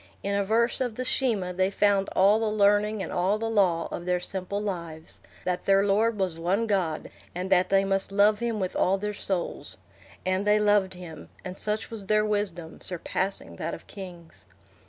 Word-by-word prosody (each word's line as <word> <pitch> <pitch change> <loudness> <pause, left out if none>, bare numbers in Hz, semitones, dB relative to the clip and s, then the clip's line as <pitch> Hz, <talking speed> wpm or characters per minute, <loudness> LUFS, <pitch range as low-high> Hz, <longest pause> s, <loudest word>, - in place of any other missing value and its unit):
In 200 - -1
a 200 0 +2
verse 230 +5 +1
of 245 -4 -1
the 255 - -3
Shema 215 -9 +1
they 185 +1 +2
found 200 0 +2
all 200 +3 +5
the 225 - 0
learning 210 0 +2
and - - -6
all 185 +4 +1
the 225 +1 -2
law 190 -7 +2
of 175 - -5
their 180 0 +2
simple 190 +2 -3
lives—that 175 -1 -5
their 195 0 +5
Lord 215 +3 +2
was 185 -4 -1
One 190 +7 +1
God, 185 -7 -1 0.2
and 185 +2 -4
that 185 -1 +4
they 195 0 +4
must 195 0 0
love 205 +1 +4
him 235 -2 -1
with 185 -2 -2
all 190 +2 +2
their 210 +1 -3
souls. 190 -3 -2 0.5
And 185 +2 0
they 210 0 +5
loved 205 -3 +3
him, 175 -3 -10 0.2
and 185 0 -5
such 215 +3 -2
was 210 -4 -7
their 215 +1 +3
wisdom, 190 -6 -3
surpassing 180 - -2
that 165 - -3
of - - -14
kings. 180 -4 -11
195 Hz, 190 wpm, -27 LUFS, 180-210 Hz, 0.5 s, all